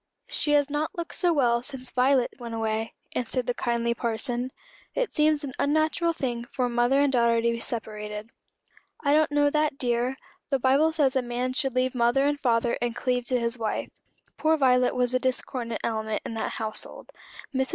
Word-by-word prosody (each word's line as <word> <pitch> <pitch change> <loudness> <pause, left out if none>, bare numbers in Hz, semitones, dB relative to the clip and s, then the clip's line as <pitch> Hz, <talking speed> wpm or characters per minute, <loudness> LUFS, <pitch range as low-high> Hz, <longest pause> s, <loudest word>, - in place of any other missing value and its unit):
"She 295 - +2
has 290 -1 +4
not 300 +6 -2
looked 340 -1 -4
so 355 -2 +2
well 240 -6 +2
since 255 -1 -4
Violet 255 0 +3
went 235 -2 -6
away," 220 0 -2 0.2
answered 250 +1 -1
the 245 - 0
kindly 235 -1 0
parson. 240 +2 -2 0.4
"It - - -1
seems 305 0 +3
an 270 -3 -5
unnatural 315 +3 +2
thing 245 -7 -3
for 250 0 -1
mother 240 +3 +2
and 285 -1 +2
daughter 235 -2 +3
to 235 +1 +2
be 230 - -3
separated." 215 -1 -5 0.7
"I 285 -1 +2
don't 305 0 +3
know 290 0 +3
that, 300 -2 +1
dear. 245 +1 0 0.3
The 275 - +2
Bible 270 +5 +3
says 290 -5 +2
a 260 - +3
man 245 +1 -2
should 270 -1 -1
leave 255 0 +1
mother 245 +2 +3
and 290 0 +1
father 235 -2 +1
and 240 -1 -1
cleave 250 -1 -1
to 250 0 +1
his 235 +1 -2
wife. 220 -1 -2 0.5
Poor 315 0 +3
Violet 250 -3 +3
was 250 0 +1
a 255 - +3
discordant 255 -2 -2
element 220 -1 -2
in - - -4
that 225 - -3
household. 220 -1 -4 0.4
Mrs. 265 0 +1
250 Hz, 190 wpm, -26 LUFS, 235-285 Hz, 0.7 s, has